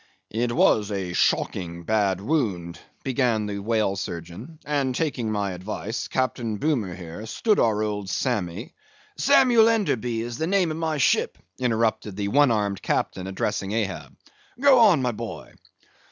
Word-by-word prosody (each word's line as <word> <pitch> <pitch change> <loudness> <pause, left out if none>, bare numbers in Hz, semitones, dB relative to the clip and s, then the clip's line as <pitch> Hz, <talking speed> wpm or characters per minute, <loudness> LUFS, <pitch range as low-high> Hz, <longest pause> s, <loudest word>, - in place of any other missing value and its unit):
"It 120 +2 -1
was 110 -3 +3
a 95 -3 -3
shocking 85 -1 0
bad 100 -1 +1
wound," 100 - -1 0.2
began 125 -5 +1
the 100 -1 -4
whale 110 -1 0
surgeon; 90 - -7
"and, 140 -3 0
taking 125 -8 -1
my 100 -2 -1
advice, 105 +4 -5
Captain 120 -4 -1
Boomer 120 - -1
here, 90 +4 -8
stood 215 - +1
our 110 -2 +2
old 105 -2 -3
Sammy—" 100 -11 -2 0.5
"Samuel 235 -3 +5
Enderby 125 - 0
is 120 +3 -5
the 160 - 0
name 185 -3 +2
of 155 - -4
my 160 -2 -1
ship," 140 - +2 0.2
interrupted 115 -4 0
the 100 0 -2
one 145 +4 +4
armed 105 -3 0
captain, 95 0 -1
addressing 95 +1 -2
Ahab; 105 -4 -3 0.4
"go 275 -2 +6
on, 195 - +5
boy." 115 +1 -7
110 Hz, 145 wpm, -24 LUFS, 100-135 Hz, 0.5 s, go